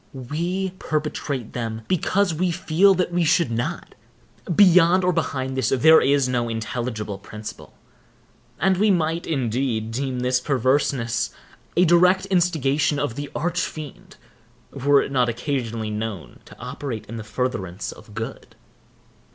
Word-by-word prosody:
We 170 +9 -3
perpetrate 150 -5 -3
them 115 -2 -4
because 185 +1 +1
we 180 +3 0
feel 185 +3 +3
that 180 -1 0
we 175 0 +1
should 160 -4 +2
not. 115 +1 -3 0.6
Beyond 185 -1 +6
or 180 0 +2
behind 130 -5 -2
this 130 -3 0
there 160 +5 +6
is 140 -1 +3
no 120 -2 -1
intelligible 115 -2 -4
principle; 105 +2 -10 0.8
and 190 +4 +2
we 210 +3 +3
might, 165 -2 0
indeed, 120 -5 -1
deem 130 +1 -2
this 125 0 +2
perverseness 130 -2 0 0.5
a 180 - +6
direct 180 +3 +4
instigation 155 -5 +2
of 145 -4 -1
the 145 +3 -6
Arch 175 +3 -1
Fiend, 155 -4 -7 0.5
were 140 +1 +3
it - - -6
not 125 -3 +2
occasionally 115 -3 -3
known 105 -4 -5
to - - -15
operate 115 -7 -6
in 115 +2 -7
furtherance 105 -4 -3
of 110 -1 -14
good. 110 0 -7
140 Hz, 135 wpm, -23 LUFS, 115-170 Hz, 0.8 s, Beyond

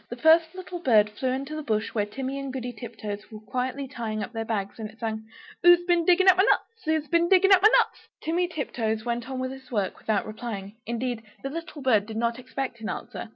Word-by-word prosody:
The 240 - -5
first 320 +5 +4
little 365 -1 -6
bird 215 -9 +4
flew 255 +5 -2
into 275 +4 -3
the 310 - -3
bush 220 -6 -1
where 210 -2 0
Timmy 265 +5 -4
and 275 -1 -4
Goody 250 -2 -4
Tiptoes 215 -3 -7
were 215 - -8
quietly 255 +5 -3
tying 220 -5 -4
up 215 - -7
their 225 0 -2
bags, 210 -2 -3
and 215 -1 -4
it 220 - -17
sang 220 -1 -4 0.3
"Who's 350 0 +7
bin 345 -2 +2
digging 370 +2 +5
up 375 - +8
my 380 - +6
nuts? 455 +2 +1
Who's 315 -1 0
been 340 +1 +2
digging 385 +1 +6
up 370 - +6
my 420 - +8
nuts?" - - +2 0.2
Timmy 345 +2 +1
Tiptoes 225 -9 -2
went 240 +1 -2
on 265 - -4
with 255 0 -2
his 265 -1 -11
work 205 -6 -2
without 215 -2 0
replying; 215 -2 -6
indeed, 235 0 -2 0.2
the 275 - -3
little 330 -2 -7
bird 215 -6 +3
did 220 -1 -6
not 235 +1 0
expect 255 -2 -5
an 215 - -4
answer. - - -6
255 Hz, 235 wpm, -26 LUFS, 220-315 Hz, 0.3 s, up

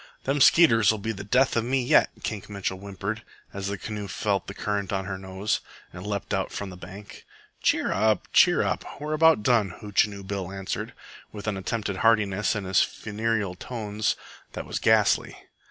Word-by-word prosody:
"Them 140 +1 0
skeeters'll 115 -8 +6
be 110 +2 -3
the 100 -2 -6
death 125 +6 +2
of 115 - +2
me 130 +2 0
yet," - - +4
Kink 105 -2 -4
Mitchell 100 -2 -3
whimpered, 100 +2 -5 0.3
as 100 0 -4
the 100 0 -3
canoe 105 +1 -5
felt 100 0 -1
the 100 - -7
current 100 -2 -2
on 95 -1 -1
her 95 0 -3
nose, 95 +2 -2 0.3
and 90 +3 -8
leaped 100 0 -3
out 95 -1 -1
from 100 -2 -5
the - - -9
bank 95 +3 -11 0.4
"Cheer - - +2
up, 110 +1 +2
cheer - - +6
up. - - -1 0.2
We're 150 +1 -3
about 160 -6 +5
done," 105 -7 +2
Hootchinoo 105 -1 0
Bill 95 -2 -4
answered, 95 -1 -4 0.4
with 105 -1 -8
an 105 -2 -1
attempted 100 +1 -3
heartiness 105 -2 +2
in 105 - -3
his 95 0 +3
funereal 110 -2 -1
tones 105 +1 -2 0.4
that - - -5
was - - -3
ghastly. - - +3
105 Hz, 180 wpm, -26 LUFS, 95-110 Hz, 0.4 s, skeeters'll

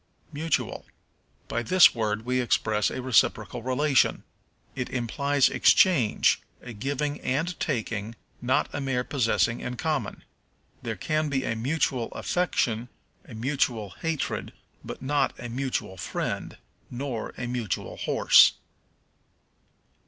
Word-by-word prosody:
Mutual. 155 +1 -2 0.6
By 120 - -2
this 180 +10 +6
word 110 -1 -2
we 125 0 +1
express 110 -3 +1
a 130 - -5
reciprocal 115 -2 +2
relation. 130 +3 +2 0.5
It 125 - -4
implies 140 +3 +1
exchange, 150 - +4 0.2
a 125 - -9
giving 145 +6 -2
and 155 +7 -1
taking, 115 -5 -2 0.3
not 125 +1 +1
a 145 - -3
mere 135 -2 -1
possessing 115 -3 +1
in 125 0 -5
common. 155 -1 -2 0.6
There - - -4
can 155 0 -1
be 135 -2 -1
a 115 - -1
mutual 125 -1 0
affection, 120 -10 -1 0.4
or - - -15
a - - -8
mutual 120 -4 -1
hatred, 160 +2 -3 0.3
but - - -8
not 145 +1 0
a 120 - -6
mutual 125 -6 -3
friend, - - -4 0.3
nor 125 -3 -5
a 120 - -4
mutual 120 -4 -3
horse. - - +5
125 Hz, 125 wpm, -26 LUFS, 115-145 Hz, 0.6 s, this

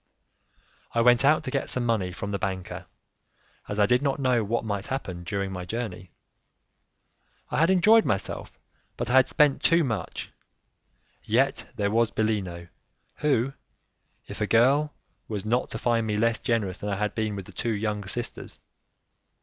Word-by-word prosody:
I 115 - +2
went 120 +1 +5
out 150 +3 +4
to 130 - -4
get 140 - -1
some 125 -1 +1
money 105 -6 0
from 100 +3 -5
the 100 - -2
banker, 95 -3 -4 0.8
as 105 - -4
I 105 - +6
did 125 +4 +3
not 140 -2 0
know 125 -4 +2
what 115 +3 -1
might 100 -2 -3
happen 95 -10 -4
during 100 0 -3
my 90 -1 -5
journey. 95 -3 -5 1.4
I - - 0
had 165 +2 +4
enjoyed 210 +5 +6
myself, 95 -1 -3 0.4
but - - -2
I - - +1
had 130 0 +6
spent 150 -3 +3
too 170 0 +4
much: 115 - -4 0.9
yet - - +1
there 100 0 0
was 115 0 +3
Bellino 95 -7 -2 0.5
who, 135 -3 +1 0.7
if - - -8
a 105 - +1
girl, 135 +7 +4 0.4
was 105 -2 -4
not 120 +3 0
to - - -5
find 115 -2 +1
me 105 -1 0
less 115 +1 +2
generous 105 -6 -1
than 105 - -4
I 100 - 0
had 105 +1 -1
been 110 -2 -2
with 100 -2 -6
the - - -12
two 120 - -3
young 105 0 -2
sisters. 120 +4 -4
110 Hz, 170 wpm, -26 LUFS, 100-125 Hz, 1.4 s, I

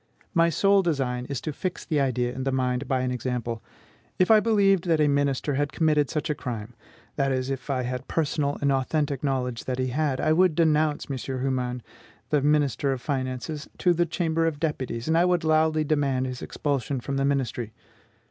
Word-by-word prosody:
My 170 -2 +4
sole 195 +4 +4
design 135 -8 -1
is 140 -3 -3
to 155 - -4
fix 180 +4 -4
the 155 -3 0
idea 125 -2 0
in 130 - -4
the 135 - 0
mind 130 0 -1
by 130 -1 +1
an 130 0 -1
example. 120 -2 -3 0.6
If 185 +3 +3
I 220 - +8
believed 200 -5 +3
that 165 -3 +2
a 150 - +4
minister 140 0 +1
had 145 +1 0
committed 150 -3 +2
such 150 - -2
a 150 - +1
crime, 120 -5 -6 0.4
that 135 -1 +1
is, 130 0 -1
if 135 +1 -5
I 130 -2 0
had 125 +1 -4
personal 150 -2 0
and 140 -1 +2
authentic 140 +1 0
knowledge 125 -4 -1
that 130 -1 -2
he 130 0 -1
had, 140 0 0
I 155 - +2
would 180 -1 +3
denounce 155 -2 +2
M. 135 - -3 0.2
Humann, 125 -2 -2 0.5
the 150 -2 +3
minister 145 -1 +2
of 130 - -2
finances, 130 +2 -3
to 180 - +3
the 175 +1 +1
Chamber 165 -2 0
of 150 -3 -2
Deputies, 130 -7 -3
and 165 +3 +3
would 175 -2 +1
loudly 155 0 +3
demand 140 -4 +1
his 125 -1 -5
expulsion 140 -2 -2
from 135 +3 -3
the 135 - +1
ministry. 125 -5 -1
140 Hz, 195 wpm, -26 LUFS, 130-155 Hz, 0.6 s, I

